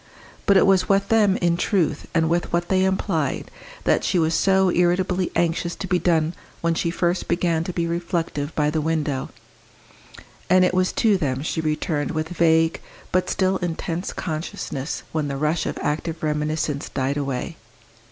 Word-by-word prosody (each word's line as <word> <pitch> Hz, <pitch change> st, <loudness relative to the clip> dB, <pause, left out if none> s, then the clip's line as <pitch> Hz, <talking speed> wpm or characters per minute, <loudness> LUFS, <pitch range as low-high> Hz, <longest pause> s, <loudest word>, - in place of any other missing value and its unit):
But 200 Hz, -, +6 dB
it -, -, +5 dB
was 190 Hz, -2 st, +3 dB
with 200 Hz, 0 st, +2 dB
them, 210 Hz, -4 st, +4 dB
in 170 Hz, -1 st, +1 dB
truth, 175 Hz, -6 st, 0 dB
and 165 Hz, -1 st, +3 dB
with 170 Hz, +2 st, 0 dB
what 175 Hz, 0 st, 0 dB
they 190 Hz, 0 st, +3 dB
implied, 190 Hz, -6 st, -1 dB, 0.3 s
that -, -, +2 dB
she -, -, +1 dB
was 160 Hz, -1 st, +2 dB
so 190 Hz, +1 st, +3 dB
irritably 180 Hz, +1 st, +1 dB
anxious 170 Hz, 0 st, 0 dB
to -, -, -5 dB
be 180 Hz, -1 st, +1 dB
done 165 Hz, -2 st, +2 dB, 0.3 s
when 170 Hz, 0 st, +1 dB
she 170 Hz, -, -1 dB
first 175 Hz, +1 st, -1 dB
began 170 Hz, -2 st, +1 dB
to 180 Hz, -, -3 dB
be 170 Hz, -1 st, -1 dB
reflective 170 Hz, -3 st, -2 dB
by 150 Hz, -1 st, +2 dB
the 155 Hz, 0 st, 0 dB
window; 150 Hz, -4 st, -1 dB, 1.2 s
and 185 Hz, 0 st, +6 dB
it 180 Hz, -, +1 dB
was 185 Hz, 0 st, +2 dB
to 215 Hz, -3 st, +3 dB
them 135 Hz, -5 st, -2 dB
she 160 Hz, -, -2 dB
returned 150 Hz, -1 st, -1 dB
with 155 Hz, 0 st, -2 dB
vague, 165 Hz, -2 st, +2 dB, 0.3 s
but 185 Hz, 0 st, +1 dB
still 190 Hz, 0 st, +1 dB
intense 175 Hz, 0 st, -3 dB
consciousness 155 Hz, -4 st, -4 dB
when 155 Hz, -2 st, -1 dB
the 140 Hz, -1 st, -3 dB
rush 155 Hz, +3 st, 0 dB
of -, -, -3 dB
active 160 Hz, +2 st, -2 dB
reminiscence 150 Hz, -1 st, -1 dB
died 135 Hz, 0 st, -1 dB
away. 140 Hz, +3 st, -3 dB
170 Hz, 170 wpm, -23 LUFS, 155-185 Hz, 1.2 s, But